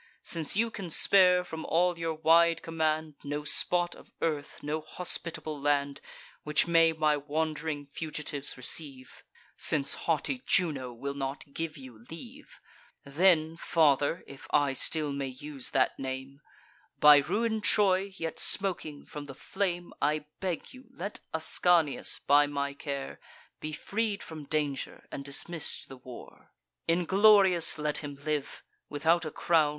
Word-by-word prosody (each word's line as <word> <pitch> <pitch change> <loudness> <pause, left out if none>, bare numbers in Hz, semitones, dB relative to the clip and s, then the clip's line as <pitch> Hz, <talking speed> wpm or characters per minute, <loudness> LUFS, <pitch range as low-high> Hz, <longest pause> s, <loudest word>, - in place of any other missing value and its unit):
Since 165 +2 -1
you 230 +1 +1
can 195 -6 -6
spare, 180 +1 +4
from 160 -2 -7
all 175 +1 +1
your 165 -1 -2
wide 165 +1 +4
command, 155 -1 -1
No 145 +1 -3
spot 175 +3 +1
of - - -16
earth, 150 -3 -3
no 150 +2 -2
hospitable 155 -2 -3
land, 140 -1 0 0.4
Which 150 0 +2
may 165 -1 +5
my 155 -2 +2
wand'ring 150 0 -3
fugitives 150 -1 -4
receive; 130 0 -5 0.3
(Since 140 -2 +3 0.2
haughty 210 - 0
Juno 145 -9 +1
will 140 +4 -5
not 140 0 -5
give 165 -1 -4
you 125 -5 -12
leave;) 245 - -12 0.4
Then, 160 +2 +3
father, 155 -1 +2
(if 140 - -12
I 145 -2 +2
still 150 +2 0
may 140 -1 -3
use 135 +1 -4
that 130 -2 +1
name,) 135 +1 -6 0.6
By 150 0 +9
ruin'd 215 +9 0
Troy, 195 0 +3
yet 165 -1 -4
smoking 175 -7 -2
from 150 -2 -8
the 135 -2 -10
flame, 175 -1 -3
I 150 0 +1
beg 185 -4 -4
you, 260 +1 -14
let 215 -6 -6
Ascanius, 160 -1 +2
by 145 +1 +4
my 140 -1 -2
care, 140 -1 -5 0.4
Be 155 - -5
freed 205 +6 -2
from 155 -2 -9
danger, 145 -2 -3
and 140 - -6
dismiss'd 145 +3 -3
the 135 - -10
war: 125 -1 -12 0.4
Inglorious 190 +1 +5
let 150 -1 -1
him 145 -2 -7
live, 150 -2 -3 0.3
without 160 +3 +2
a 155 - -4
crown. 160 -2 +2
155 Hz, 140 wpm, -29 LUFS, 145-175 Hz, 0.6 s, By